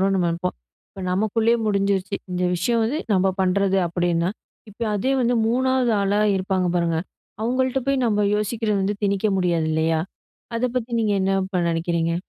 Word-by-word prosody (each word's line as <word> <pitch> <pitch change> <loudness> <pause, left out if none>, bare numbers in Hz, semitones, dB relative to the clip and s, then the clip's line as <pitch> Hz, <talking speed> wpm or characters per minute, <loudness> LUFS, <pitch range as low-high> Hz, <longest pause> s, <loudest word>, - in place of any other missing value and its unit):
நம்ப 180 -2 +1
நெனைப்போம். 170 - -2 0.3
இப்ப 195 - -10
நம்பக்குள்ளயே 220 +5 +2
முடிஞ்சிருச்சு. 200 -1 0 0.2
இந்த 180 0 -1
விஷயம் 230 +6 +1
வந்து 275 +8 -1
நம்ப 190 0 +3
பண்றது 195 +1 +2
அப்டின்னா, 175 0 0 0.4
இப்ப 210 +3 -17
அதே 255 +7 0
வந்து 240 0 +2
3வது 255 0 +2
ஆளா 200 +1 +1 0.2
இருப்பாங்க 185 -1 0
பாருங்க. 170 -2 +1 0.4
அவங்கள்ட்ட 255 +3 +1
போய் 275 -2 +2
நம்ம 210 -2 +2
யோசிக்கிறத 210 0 -1
வந்து 200 +2 0
திணிக்க 200 +1 +1
முடியாது 170 -3 +1
இல்லையா? 160 0 +1 0.6
அத 230 - +1
பத்தி 235 0 -5
நீங்க 210 -2 +1
என்ன 190 +1 +1
இப்ப 190 -2 -2
நெனைக்கிறீங்க? 165 0 0
195 Hz, 155 wpm, -23 LUFS, 180-230 Hz, 0.6 s, நம்ப